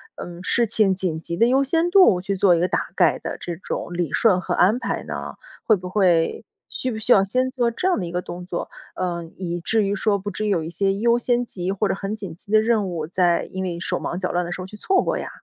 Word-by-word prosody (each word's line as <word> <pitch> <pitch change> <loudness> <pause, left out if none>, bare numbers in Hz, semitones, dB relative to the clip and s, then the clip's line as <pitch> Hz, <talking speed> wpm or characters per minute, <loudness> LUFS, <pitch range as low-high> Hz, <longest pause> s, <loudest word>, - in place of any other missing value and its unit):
嗯， 175 +1 -8
事 235 +5 +2
情 210 -3 +2
紧 175 -4 -2
急 170 +1 -5
的 230 - +5
优 265 +3 +3
先 330 +5 +1
度 365 - +6
去 195 +2 -2
做 185 -2 +4
一 - - 0
个 180 - +2
大 - - -1
概 - - +3
的 - - -5
这 175 -1 -5
种 175 0 -5
理 175 -4 -2
顺 195 -6 +3
和 180 - -2
安 205 +7 +3
排 - - -3
呢？ - - -6 0.3
会 220 - +4
不 180 -2 -7
会 180 -4 +2 0.3
需 255 - -3
不 220 - -4
需 220 +3 -1
要 195 - +5
先 255 +6 0
做 245 -3 +1
这 360 +11 -2
样 365 - +2
的 180 - -3
一 - - -7
个 180 +1 -2
动 180 0 -8
作？ 175 -1 -4 0.3
呃， 175 -2 -2
以 175 -2 -3
至 220 +4 +1
于 200 +1 0
说， 205 0 +1
不 200 +2 -5
至 215 +3 -3
于 - - 0
有 175 -5 +1
一 160 - -5
些 195 +3 +1
优 235 +3 +3
先 245 0 +1
级 185 -4 -4
或 200 +1 0
者 - - 0
很 200 +2 -4
紧 195 -6 -7
急 200 - -15
的 215 0 +6
任 220 -3 +1
务， 165 -3 -3
再 175 0 +2
因 190 0 -3
为 175 -2 -3
手 - - -2
忙 175 - -4
脚 185 - -2
乱 175 0 0
的 175 - -6
时 175 - -5
候 185 - -5
去 210 - -11
错 380 - +2
过 - - -1
呀？ - - -5
190 Hz, 295 characters per minute, -22 LUFS, 175-220 Hz, 0.3 s, 度